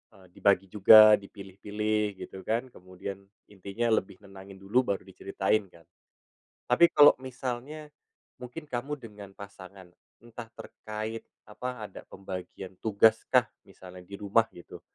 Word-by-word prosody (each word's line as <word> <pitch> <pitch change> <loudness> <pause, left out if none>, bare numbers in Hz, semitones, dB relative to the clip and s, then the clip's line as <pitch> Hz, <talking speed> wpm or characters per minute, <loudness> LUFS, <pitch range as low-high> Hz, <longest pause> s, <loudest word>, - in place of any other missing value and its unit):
eee, 95 -1 -19
dibagi 95 -1 +1
juga, 110 +1 +8
dipilih-pilih 105 +1 -4
gitu 95 - -10
kan, 120 +3 -2
kemudian 95 +1 -9 0.3
intinya 100 +4 -3
lebih 95 -4 0
nenangin 95 0 -13
dulu 105 +7 0
baru - - -11
diceritain 100 +2 -2
kan. 85 -2 -20 0.8
Tapi 170 +8 +4
kalau 145 0 +9
misalnya 130 +4 -6 0.5
mungkin 125 +6 -8
kamu 145 +2 -4
dengan 105 -6 -13
pasangan, 95 -2 -13 0.3
entah 120 -1 -10
terkait 110 +1 -7 0.2
apa, 125 +1 -7
ada 100 - -10
pembagian 95 0 -8
tugas 110 +1 +3
kah - - +4 0.2
misalnya 90 0 -13
di 100 +2 -10
rumah 105 +3 +1
gitu 85 - -12
105 Hz, 130 wpm, -28 LUFS, 95-115 Hz, 0.8 s, kalau